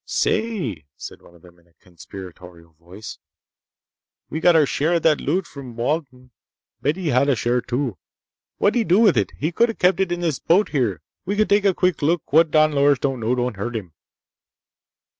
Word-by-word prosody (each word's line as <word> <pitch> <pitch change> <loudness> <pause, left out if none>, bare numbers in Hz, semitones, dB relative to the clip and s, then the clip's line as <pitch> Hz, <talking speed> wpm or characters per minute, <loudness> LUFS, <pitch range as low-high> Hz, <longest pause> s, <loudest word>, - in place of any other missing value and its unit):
"Say!" 170 - -2
said - - -10
one 85 - -19
of 85 - -21
them 85 -1 -18
in 85 - -29
a 85 - -32
conspiratorial 90 -1 -13
voice. 90 +6 -11 1.1
"We 160 - -3
got 175 +1 +4
our 155 -2 +5
share 155 +5 0
of 170 - -1
that 155 -2 +3
loot 180 +6 -1
from 130 -7 -11
Walden. 130 0 -3 0.5
But 145 - 0
he 180 -4 -3
hadda 140 +1 +2
share, 120 +2 0
too! 125 -4 -3 0.6
What'd 205 - +2
he 235 - +2
do 185 -2 +3
with 210 -7 +5
it? 105 -4 +1
He 155 +5 -2
could've 230 +5 +1
kept 180 +2 +2
it 190 -2 0
in 175 0 -2
this 160 -6 -1
boat 190 +5 +2
here. 115 - -1 0.2
We 200 +3 -3
could 215 +1 +1
take 205 0 +3
a 195 -3 +3
quick 180 -5 0
look! 155 0 -1
What 165 +1 +5
Don 155 0 +3
Loris 140 -1 +3
don't 135 -1 -2
know 115 +2 0
don't 125 -3 -2
hurt 120 +4 -4
him!" 95 -8 -6
140 Hz, 195 wpm, -21 LUFS, 110-175 Hz, 1.1 s, our